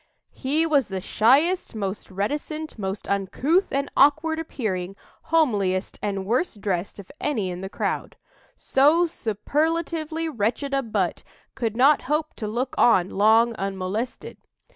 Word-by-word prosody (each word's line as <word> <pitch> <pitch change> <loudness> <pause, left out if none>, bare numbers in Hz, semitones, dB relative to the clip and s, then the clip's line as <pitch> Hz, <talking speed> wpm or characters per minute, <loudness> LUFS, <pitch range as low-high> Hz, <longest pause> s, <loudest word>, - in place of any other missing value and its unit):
"He 295 +5 0
was 285 -6 +2
the 190 -1 -4
shyest, 280 - +2
most 200 -1 -4
reticent, 295 - -4
most 195 0 -4
uncouth 255 - +1
and 275 +1 0
awkward 310 +3 +4
appearing, 195 - -3 0.3
homeliest 205 - +1
and 195 -2 -2
worst 235 - -1
dressed 190 -2 -2
of 200 -2 -11
any 215 -11 -1
in 180 +1 -6
the 190 - -5
crowd. - - -3 0.4
So 300 +6 +3
superlatively 320 - -2
wretched 250 +1 -2
a 275 - +2
butt 210 -7 -1 0.3
could 230 -3 -3
not 280 +3 +5
hope 305 +1 0
to 215 - -4
look 240 +5 -2
on 190 -6 +4
long 220 +4 +4
unmolested. 195 +5 -4
235 Hz, 135 wpm, -24 LUFS, 200-300 Hz, 0.4 s, not